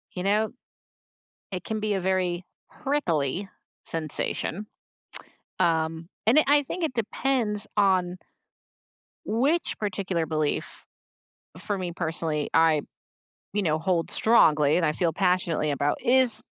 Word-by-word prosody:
You 180 - -3
know, 210 +2 +1 1.0
it 180 - -4
can 220 -1 -3
be 210 -1 0
a 190 - 0
very 180 -1 0 0.3
prickly 190 - -1 0.4
sensation, 165 +5 -3 0.9
um, 165 0 +1 0.2
and 245 +7 +6
it 310 - +5
I 290 0 +5
think 340 +5 -5
it 280 - -2
depends 225 -2 -1
on 185 -3 +2 1.1
which 275 +10 0
particular 190 -5 -2
belief, 155 -2 -2 0.7
for 200 +3 -3
me 180 -2 -3
personally, 160 -3 -2
I, 160 -2 +4 0.7
you 205 +1 0
know, 155 -4 +1
hold 170 -1 0
strongly 150 -10 +4
and 175 -2 +2
I 150 - +2
feel 165 +1 0
passionately 180 -4 +1
about 145 +1 0
is 255 -2 +3
185 Hz, 125 wpm, -26 LUFS, 160-215 Hz, 1.1 s, and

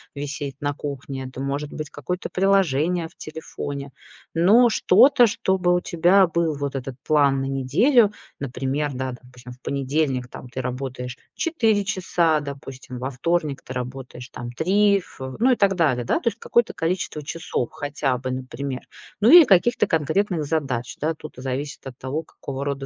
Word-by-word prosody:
висеть 145 -1 -4
на 145 0 0
кухне, 140 -2 -6
это 130 +1 -8
может 140 +2 -3
быть 155 -2 -5
какое-то 180 +6 -4
приложение 180 -3 +2
в - - -28
телефоне, 145 -3 -6 0.4
но 210 +9 +6
что-то, 240 +4 +5
чтобы 190 -3 +1
у 180 - +1
тебя 180 +3 +4
был 165 -2 0
вот 140 -1 -3
этот 130 -1 -5
план 140 -3 +3
на - - -2
неделю. 200 - +3 0.3
Например, 135 +2 -2
да, 130 0 -3
допустим, 125 0 -13
в 125 - -20
понедельник, 135 -2 -1
там, 125 - -10
ты 130 +2 -4
работаешь 125 -1 -5 0.2
4 225 - +1
часа, 175 -5 +1
допустим, 135 -3 -8
во 130 +2 -3
вторник 150 +1 -1
ты 130 - -7
работаешь, 125 0 -6
там, 120 0 -7
3. 200 +8 +3
В 130 -6 -9
ну 255 +4 +4
и - - +4
так 200 -3 +2
далее, 140 -9 +1
да. - - +1
То - - -6
есть 235 - +1
какое-то 235 -1 +1
количество 165 -2 -2
часов 145 -5 -3
хотя 145 -3 -2
бы, 130 0 -4
например, 130 0 -5 0.4
ну 220 +5 +5
или 345 -2 +11
каких-то 210 +2 +4
конкретных 165 +2 +1
задач, 130 -8 -2
да. 160 +2 -1
Тут, 155 -2 -11
а, - - -8
зависит 135 +2 -4
от 130 -2 -9
того, 135 +4 -3
какого 140 -3 -7
рода 140 -1 -3
145 Hz, 170 wpm, -23 LUFS, 130-180 Hz, 0.4 s, или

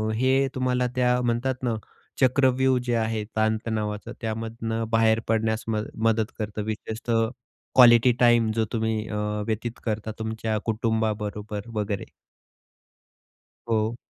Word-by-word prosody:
हे 130 +3 +3
तुम्हाला 125 -1 +1
त्या 125 0 +3
म्हणतात 120 +2 0
ना, 120 -2 +1 0.5
चक्रव्यूह 130 0 +3
जे 120 -1 +1
आहे 110 -1 0
ताण-तणावाच 110 -1 0 0.2
त्यामधनं 115 0 -3
बाहेर 115 0 +4
पडण्यास 110 0 0
मद 110 -1 -1 0.2
मदत 110 0 +1
करतं, 105 0 -3
विशेषतः 110 +1 -1 0.5
क्वालिटी 120 -1 +8
टाइम 120 -2 +4
जो 110 - +2
तुम्ही 110 -1 -1
अ, 105 - -4 0.3
व्यतीत 115 +2 -3
करता 110 0 -2
तुमच्या 110 0 -2
कुटुंबाबरोबर 110 -1 -2
वगैरे. 105 -2 -3 1.6
हो. 110 +1 +1
110 Hz, 115 wpm, -25 LUFS, 110-120 Hz, 1.6 s, क्वालिटी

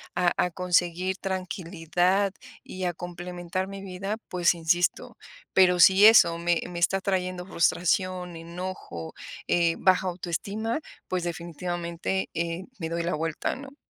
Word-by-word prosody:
a 180 -1 +3
a 180 - +2
conseguir 180 +1 +1
tranquilidad 185 0 0 0.3
y 185 0 -5
a 175 - 0
complementar 175 +1 -5
mi 195 0 -8
vida, 195 +3 -4
pues 180 -1 +2
insisto, 170 +1 0 0.4
pero 180 -1 +5
si 190 +3 +8
eso 170 -7 +6
me 170 -1 +1
me 175 -1 -5
está 195 +3 +2
trayendo 185 -2 -1
frustración, 180 0 0
enojo, 170 - -7 0.3
eh, 170 -1 +3
baja 185 0 +3
autoestima, 200 - -3 0.3
pues 180 -1 -2
definitivamente, 175 +2 -3
eh, 170 +2 -2 0.2
me 165 -2 -3
doy 170 0 -2
la 170 - -1
vuelta, 160 +1 -2
¿no? 275 +1 -11
180 Hz, 135 wpm, -27 LUFS, 170-185 Hz, 0.4 s, si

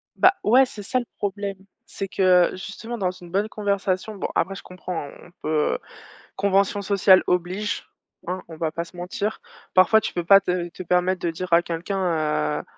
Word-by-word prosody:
Bah, 375 +1 +5
ouais 255 +5 +6
c'est 215 -5 -9
ça 255 +6 0
le 240 - -5
problème. 200 -1 -3 0.3
C'est 195 - -5
que 180 -2 +4
justement 220 +5 -7
dans 185 -4 0
une 175 -1 -13
bonne 200 +4 0
conversation 200 0 -1
bon 195 - -3
après 195 - 0
je - - -8
comprends 180 -4 -6
hein, - - -11
on - - -16
peut, 155 -1 +1
heu, - - -1 0.6
convention 200 +1 +2
sociale 195 -1 +5
oblige, 180 +4 -1 0.4
hein, 185 +1 -3
on 160 - -10
va 160 -1 -1
pas 170 +2 -3
se 170 +1 -15
mentir, 195 +4 -3 0.3
parfois 185 +4 +6
tu - - -4
peux 175 -1 -2
pas 195 +3 +8
te 180 -2 -1
te 185 - -9
permettre 180 +1 +1
de - - +2
dire 175 +1 -4
à 170 - +7
quelqu'un, 165 - -1
heu: - - -8
185 Hz, 195 wpm, -24 LUFS, 175-200 Hz, 0.6 s, pas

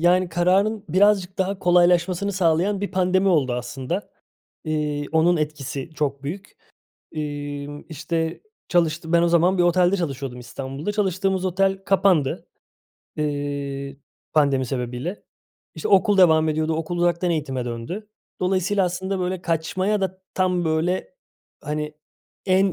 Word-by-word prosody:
yani, 180 +1 +3
kararın 190 +5 +2
birazcık 190 +2 +3
daha 190 +1 0
kolaylaşmasını 180 +2 +3
sağlayan 185 +2 +1
bir 200 - -3
pandemi 185 0 +2
oldu 140 -8 +2
aslında. 130 +9 -4 0.5
Eee, 150 -2 -1
onun 170 +2 +4
etkisi 150 -2 -4
çok 140 -3 -2
büyük. 190 +8 -7 0.6
Emm, 145 -1 -5
işte, 160 +1 -3 0.3
çalıştı 165 -1 +1
ben 170 - +5
o 170 - +3
zaman 175 +3 +3
bir 175 - +5
otelde 180 +2 +3
çalışıyordum 135 -7 -4
İstanbul'da. 135 +8 -5
Çalıştığımız 190 -2 0
otel 195 +1 +1
kapandı, 190 -8 +2 0.7
eee, 140 -2 -3 0.4
pandemi 140 -4 +3
sebebiyle. 125 - -4 0.5
İşte, 160 - -4
okul 195 +1 +4
devam 160 -3 +6
ediyordu, 155 +1 0
okul 165 +2 -3
uzaktan 175 +1 +1
eğitime 135 -6 -2
döndü. 125 - -5 0.3
Dolayısıyla 185 +1 +1
aslında, 190 +2 -2
böyle, 180 0 -2
kaçmaya 185 +5 0
da 190 0 -3
tam, 180 -2 +1
böyle, 170 - -1 0.5
hani, 150 0 -3 0.5
en 190 0 +3
170 Hz, 125 wpm, -23 LUFS, 150-185 Hz, 0.7 s, devam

